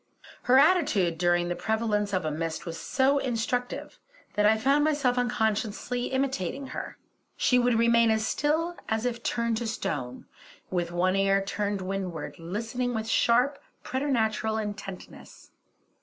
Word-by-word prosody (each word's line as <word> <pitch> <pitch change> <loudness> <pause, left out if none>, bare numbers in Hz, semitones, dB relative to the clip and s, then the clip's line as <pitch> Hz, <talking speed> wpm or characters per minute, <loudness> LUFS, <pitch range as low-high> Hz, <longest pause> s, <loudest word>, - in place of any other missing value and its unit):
Her 255 - +7
attitude 240 - +3
during 175 -1 +2
the 175 - -2
prevalence 215 -1 0
of 185 -4 -1
a 155 - -1
mist 160 +3 -3
was 165 -1 -5
so 275 +2 +2
instructive, 245 0 -3 0.3
that 210 0 +3
I 220 +1 +4
found 275 +6 +3
myself 290 -5 +2
unconsciously 240 0 -1
imitating 265 -2 -2
her. - - -6 0.4
She 250 - +3
would 245 -1 +2
remain 235 0 +4
as 220 0 +1
still 320 +7 0
as 220 +1 0
if 235 -1 -2
turned 235 -1 0
to 235 0 -3
stone, 130 - -4 0.5
with 175 -2 -1
one 185 +2 +1
ear 195 0 +3
to 205 +1 -2
windward, 180 -6 -4
listening 230 +8 -3
with 220 0 -3
sharp, 250 +5 +3 0.2
preternatural 225 -5 0
intentness. 205 -3 -8
220 Hz, 140 wpm, -27 LUFS, 195-250 Hz, 0.5 s, Her